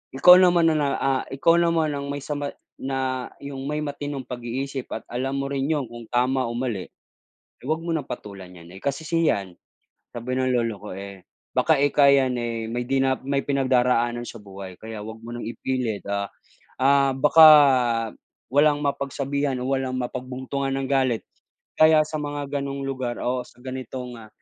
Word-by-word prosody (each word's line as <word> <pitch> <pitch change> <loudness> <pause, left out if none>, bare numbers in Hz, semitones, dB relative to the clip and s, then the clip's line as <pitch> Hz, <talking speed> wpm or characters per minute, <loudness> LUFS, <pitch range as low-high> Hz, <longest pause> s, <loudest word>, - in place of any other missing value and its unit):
ikaw 180 +7 +9
naman 175 -3 +5
na - - +1
na, 145 - +1
ah, 135 -1 +1
ikaw 145 +5 +3
naman 165 -3 +2
ang 140 0 -4
may 145 - -3
sama 145 -1 -3 0.3
na 130 -2 -2
yung 135 -1 -6
may 150 - -1
matinong 145 -2 -5
pag-iisip 125 +2 -5
at - - -4
alam 135 +3 -2
mo 140 - -2
rin 135 -1 -1
'yong 145 -4 0
kung 120 -1 -10
tama 130 +1 +1
o - - -4
mali, 120 -7 -3 0.7
eh, - - -13
wag 160 - +1
mo 170 - -3
ng 150 -5 -2
patulan 100 -6 -8
niyan 85 0 -13
eh, - - -29
kasi 140 +3 -2
si 165 0 +2
yan 95 -3 -1 0.6
sabi 120 +2 -3
ng 130 0 +1
lolo 115 -3 0
ko 105 - -8
eh, 100 -1 -9 0.3
baka 160 -3 +3
ika 145 0 +4
yan 130 -2 +3
eh, 115 -1 -3
may 120 +1 -2
dina 135 -1 +2
may 140 +1 0
pinagdaraanan 125 -3 +1
sa 115 - -8
buhay 95 -2 -9
kaya 110 -1 -7
wag 110 +1 -7
mo 120 - -9
ng - - -6
ipilit, 120 -3 -3
ah 100 0 -1 0.5
ah, 140 0 +4
baka 155 +4 +7 1.1
walang 145 +1 +4
mapag-sabihan 140 0 -1
o - - -3
walang 130 -1 -1
mapag-buntungan 130 +2 -3
ng 135 -1 -3
galit 130 -4 +1 0.6
kaya 155 -1 +6
sa 155 - -4
mga 145 -1 -4
ganong 140 0 -4
lugar 130 -3 -3
o 125 +1 -1
sa - - -21
ganitong, 130 -1 -6
ah, 110 -1 -12
130 Hz, 180 wpm, -24 LUFS, 120-140 Hz, 1.1 s, ikaw